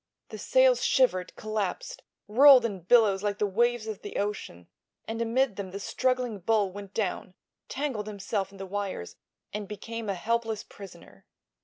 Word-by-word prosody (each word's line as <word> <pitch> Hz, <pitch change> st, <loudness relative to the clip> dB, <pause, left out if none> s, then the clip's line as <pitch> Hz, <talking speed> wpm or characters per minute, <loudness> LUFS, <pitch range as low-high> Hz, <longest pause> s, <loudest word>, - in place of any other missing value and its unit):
The -, -, -8 dB
sails -, -, +4 dB
shivered, 185 Hz, -9 st, +2 dB
collapsed, 215 Hz, -, -4 dB, 0.3 s
rolled 255 Hz, +3 st, +7 dB
in 200 Hz, -4 st, -3 dB
billows 200 Hz, +1 st, +4 dB
like 205 Hz, -1 st, -1 dB
the 210 Hz, -, +1 dB
waves 235 Hz, +3 st, +1 dB
of 220 Hz, -3 st, -6 dB
the 205 Hz, -, -6 dB
ocean, 195 Hz, -, -4 dB, 0.4 s
and 225 Hz, +1 st, -3 dB
amid 235 Hz, -1 st, +1 dB
them 200 Hz, -2 st, -5 dB
the 195 Hz, +2 st, -6 dB
struggling 250 Hz, 0 st, -1 dB
bull 205 Hz, 0 st, +1 dB
went 200 Hz, 0 st, -10 dB
down, 185 Hz, -3 st, -2 dB, 0.3 s
tangled 260 Hz, -7 st, -3 dB
himself 200 Hz, -1 st, -3 dB
in 200 Hz, -, -14 dB
the 195 Hz, -, -6 dB
wires 195 Hz, -, -4 dB, 0.4 s
and 210 Hz, -1 st, -4 dB
became 220 Hz, +2 st, -6 dB
a 195 Hz, -, 0 dB
helpless 225 Hz, +2 st, -1 dB
prisoner. 170 Hz, -, -14 dB
210 Hz, 160 wpm, -28 LUFS, 195-235 Hz, 0.4 s, rolled